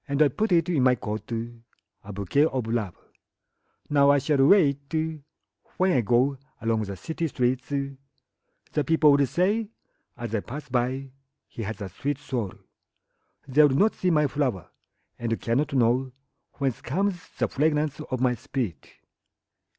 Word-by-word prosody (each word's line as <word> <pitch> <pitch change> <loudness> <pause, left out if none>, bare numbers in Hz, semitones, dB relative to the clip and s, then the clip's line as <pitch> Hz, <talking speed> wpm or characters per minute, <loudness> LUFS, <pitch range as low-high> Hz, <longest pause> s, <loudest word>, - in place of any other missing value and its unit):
put 220 -1 0
it 170 -1 +4
in 165 -6 +1
my 125 0 +5
coat,A 115 0 -7
bouquet 100 - +1
of 130 -6 -2
Love! 115 -5 -2 0.9
Now 140 -1 +4
I 145 - +6
shall 140 0 +2
wear 200 +4 +7
itWhen 155 +2 -4 0.6
I 185 -9 +3
goAlong 120 -2 0
the 100 -1 -6
city 160 - -3
streets:The 135 +2 -4
people 160 -2 +4
will 140 - +4
sayAs 200 - +1 0.5
I 120 - -5
pass 140 +7 -8
by—"He 130 +1 -4
has 110 0 -5
a 100 - -4
sweet 145 +7 -3
soul!"They 130 +3 -4
will 140 -3 +5
not 215 +6 +4
see 185 - 0
my 150 -3 +3
flower, 130 - -2 0.5
And 115 -1 -2
cannot 125 +6 0
knowWhence 130 0 -2
comes 180 +5 -2
the - - +1
fragrance 150 0 0
of 130 -4 -4
my 125 -1 +3
spirit! 115 - -5
135 Hz, 125 wpm, -26 LUFS, 120-150 Hz, 0.9 s, wear